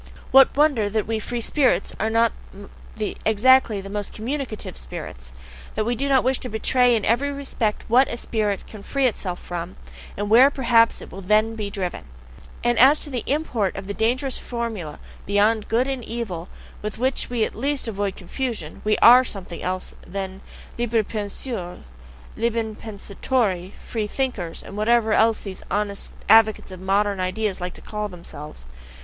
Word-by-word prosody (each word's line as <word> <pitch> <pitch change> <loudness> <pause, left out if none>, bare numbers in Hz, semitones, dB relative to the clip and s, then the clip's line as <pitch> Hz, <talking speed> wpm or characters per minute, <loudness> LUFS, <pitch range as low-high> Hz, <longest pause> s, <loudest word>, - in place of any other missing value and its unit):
What 270 +1 +6
wonder 280 -9 +3
that 215 0 0
we 225 0 -1
"free 240 +2 -4
spirits" 265 +2 +2
are 220 - +1
not 230 +1 +3 0.9
exactly 220 -1 +4
the 195 - -9
most 205 -1 -4
communicative 240 - -4
spirits? 60 +1 -8 0.4
that 215 - 0
we 240 - +1
do 275 +4 -1
not 265 -2 +4
wish 260 0 +1
to 250 - -3
betray 245 +3 +3
in 215 - -1
every 275 +6 +2
respect 265 -6 -2
WHAT 255 +4 +5
a 235 - -4
spirit 210 -4 -1
can 215 - -11
free 275 +6 0
itself 190 -7 -1
from, 175 +1 -6 0.4
and 205 +1 -2
WHERE 240 +6 +7
perhaps 235 -4 +3
it - - -12
will 195 - -8
then 215 +4 +3
be 215 -2 -4
driven? 185 - -4 0.6
And 240 -1 +2
as 275 +4 +7
to 295 - -5
the 245 -3 -2
import 260 -9 0
of 195 - -6
the 200 - -4
dangerous 250 +5 0
formula, 225 -11 -4 0.3
"Beyond 210 +2 +2
Good 240 +4 +2
and 265 -3 -3
Evil," 210 -8 -5 0.3
with 210 +1 -5
which 260 +3 -1
we 240 -2 0
at - - -6
least 275 +3 -1
avoid 200 -2 -2
confusion, 210 - -5
we 215 0 +2
ARE 250 +2 +9
something 190 -7 -6
else 185 0 -3
than 190 0 -6 0.4
"libres 230 -2 +1
penseurs," 205 -3 -5 0.5
"liben 225 -1 -1
pensatori" 200 -2 -2 0.2
"free 220 -3 -2
thinkers," 210 -9 -3
and - - -10
whatever 220 +1 +3 0.3
these 195 -2 -7
honest 205 -1 -2 0.2
advocates 220 -2 +5
of 185 - -8
"modern 200 +1 +1
ideas" 185 +1 -1
like 180 0 -4
to - - -12
call 210 -1 -4
themselves. 150 - -10
220 Hz, 165 wpm, -23 LUFS, 200-245 Hz, 0.9 s, ARE